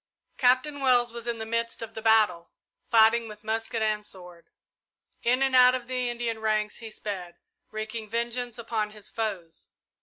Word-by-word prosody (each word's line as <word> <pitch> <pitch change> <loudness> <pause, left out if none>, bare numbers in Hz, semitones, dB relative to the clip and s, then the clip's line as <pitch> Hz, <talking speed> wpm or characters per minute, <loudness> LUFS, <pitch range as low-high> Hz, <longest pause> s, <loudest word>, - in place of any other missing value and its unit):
Captain 255 +3 +3
Wells 245 -3 +3
was 235 0 -6
in 235 -1 -1
the 220 - -5
midst 230 +1 -2
of 225 0 -8
the 220 - -6
battle, 215 -6 +3 0.4
fighting 225 +1 +5
with 210 0 -11
musket 225 +1 -2
and 215 -1 0
sword. 180 -4 -10 0.7
In 250 +3 +2
and 265 -1 +2
out 250 0 +7
of 250 -2 -4
the 250 0 -2
Indian 235 -2 -3
ranks 215 -1 0
he 225 -2 -8
sped, 185 -5 -6 0.3
wreaking 215 0 -5
vengeance 235 +1 -2
upon 225 -2 -2
his 210 -1 -10
foes. 195 -8 -4
225 Hz, 170 wpm, -27 LUFS, 215-240 Hz, 0.7 s, out